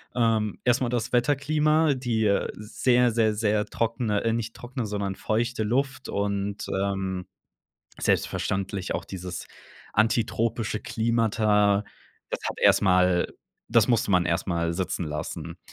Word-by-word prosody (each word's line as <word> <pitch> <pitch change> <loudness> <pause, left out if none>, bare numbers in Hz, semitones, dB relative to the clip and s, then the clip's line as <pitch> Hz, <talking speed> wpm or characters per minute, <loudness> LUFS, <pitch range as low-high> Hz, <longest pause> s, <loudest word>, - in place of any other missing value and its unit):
Ähm, 110 -3 +1
erst 120 0 +3
mal 120 - +1
das 125 +1 -2
Wetterklima, 150 +4 +3
die, 120 -4 0
äh, 100 -1 +2
sehr, 120 +3 +2
sehr, 110 -2 +2
sehr 105 -1 +1
trockene 115 -2 -1
äh, 115 0 +1
nicht 115 0 -3
trockene, 125 -1 -5
sondern 100 -2 -2
feuchte 115 +1 -1
Luft 135 +5 -1
und, 100 0 -2
ähm, 95 -1 -2 0.7
selbstverständlich 95 0 -1
auch - - -3
dieses 90 -2 -6 0.5
antitropische 115 0 +1
Klimata. 110 -3 +2 0.5
Das - - -3
hat - - -6
erst - - +5
mal 90 -2 +3 0.4
das 115 0 +4
musste 115 -4 +2
man 90 -1 +3
erst 85 0 0
mal 85 -1 0
sitzen 90 -1 -2
lassen. 75 0 -5
110 Hz, 135 wpm, -26 LUFS, 100-120 Hz, 0.7 s, erst